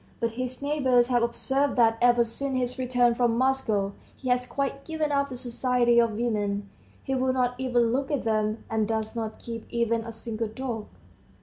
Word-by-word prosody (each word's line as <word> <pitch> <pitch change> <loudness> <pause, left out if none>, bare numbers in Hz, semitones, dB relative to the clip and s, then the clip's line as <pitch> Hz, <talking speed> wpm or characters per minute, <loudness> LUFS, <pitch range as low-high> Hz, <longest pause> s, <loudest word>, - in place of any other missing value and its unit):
But 230 0 0
his 255 +3 -5
neighbors 260 -4 +3
have 245 -1 +3
observed 265 +4 +1
that 225 -2 +4
ever 240 0 +5
since 260 +4 -3
his 250 0 -2
return 245 -1 +3
from 235 -1 +1
Moscow 225 -6 +1 0.2
he 255 - -5
has 250 0 +1
quite 275 0 -2
given 315 -1 -2
up 280 0 +1
the 255 - -6
society 245 -1 +2
of 230 -2 +3
women; 205 -3 -1 0.4
he 270 - -2
will 260 0 +1
not 250 -1 +1
even 240 -3 +2
look 270 +1 -1
at 290 -4 -1
them, 215 -1 0
and 220 -1 0
does 220 0 -2
not 220 -2 -4
keep 230 -1 -7
even 230 -1 0
a 230 0 -7
single 225 0 -4
dog. 225 -1 -5
240 Hz, 190 wpm, -27 LUFS, 225-260 Hz, 0.4 s, ever